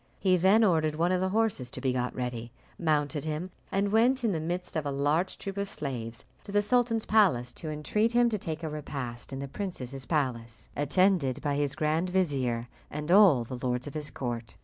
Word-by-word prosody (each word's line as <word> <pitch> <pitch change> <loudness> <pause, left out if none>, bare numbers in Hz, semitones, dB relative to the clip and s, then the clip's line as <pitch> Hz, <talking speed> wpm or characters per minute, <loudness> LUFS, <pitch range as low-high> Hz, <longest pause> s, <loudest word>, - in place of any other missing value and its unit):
He 185 -2 +3
then 190 +5 +5
ordered 160 -6 +2
one 170 +3 +1
of 185 0 +1
the 190 - +1
horses 210 - 0
to - - -7
be 130 -2 0
got 125 -1 -2
ready, 120 -2 -4 0.3
mounted 150 -3 0
him, 155 +4 -3 0.2
and 200 +1 +1
went 245 +4 +3
in 225 - +2
the 165 - -1
midst 175 +3 -4
of 155 - 0
a 145 - -2
large 145 +6 +1
troop 195 0 -6
of 200 0 -2
slaves 120 - -5 0.2
to - - -9
the 205 0 +3
sultan's 230 0 +2
palace 175 - +3
to 155 - -7
entreat 210 +10 0
him 240 0 +5
to 215 -3 -2
take 160 -2 -4
a 160 - -2
repast 135 -6 -6
in 135 - -4
the 140 +1 -4
princess's 135 -7 -5
palace, 120 -7 -2
attended 145 -2 +2
by 145 -2 0
his 140 -1 0
grand 155 +3 0
vizier 135 -10 0 0.2
and 150 +3 -4
all 185 - +7
the 120 +1 -7
lords 125 0 -1
of 145 - -7
his 150 -1 -2
court. 120 -3 -5
155 Hz, 210 wpm, -29 LUFS, 130-190 Hz, 0.3 s, all